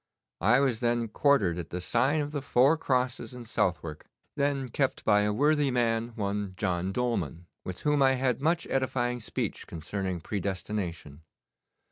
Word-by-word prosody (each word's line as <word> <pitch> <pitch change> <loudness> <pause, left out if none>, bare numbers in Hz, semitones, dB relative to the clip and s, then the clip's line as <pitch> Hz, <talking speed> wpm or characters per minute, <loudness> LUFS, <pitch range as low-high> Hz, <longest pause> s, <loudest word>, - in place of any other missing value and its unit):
I 115 +8 +5
was 130 -5 +1
then 120 -1 0
quartered 105 - +2
at 80 - -6
the 90 - -4
sign 130 - +1
of 145 0 -3
the 145 -2 -3
Four 135 +3 +4
Crosses 125 -5 -1
in 125 -1 -8
Southwark, 85 -7 -2 0.3
then 140 -2 0
kept 135 +2 -1
by 105 - +5
a 105 0 +1
worthy 145 +5 +3
man, 115 -2 0
one 100 -3 -2
John 90 -2 -1
Dolman, 95 - -2 0.2
with 90 -1 -6
whom 150 -1 +2
I 135 -1 +5
had 130 -1 0
much 165 +3 +1
edifying 125 -2 0
speech 110 - -4
concerning 90 +2 -4
predestination. 90 -5 -4
120 Hz, 155 wpm, -29 LUFS, 95-135 Hz, 0.3 s, I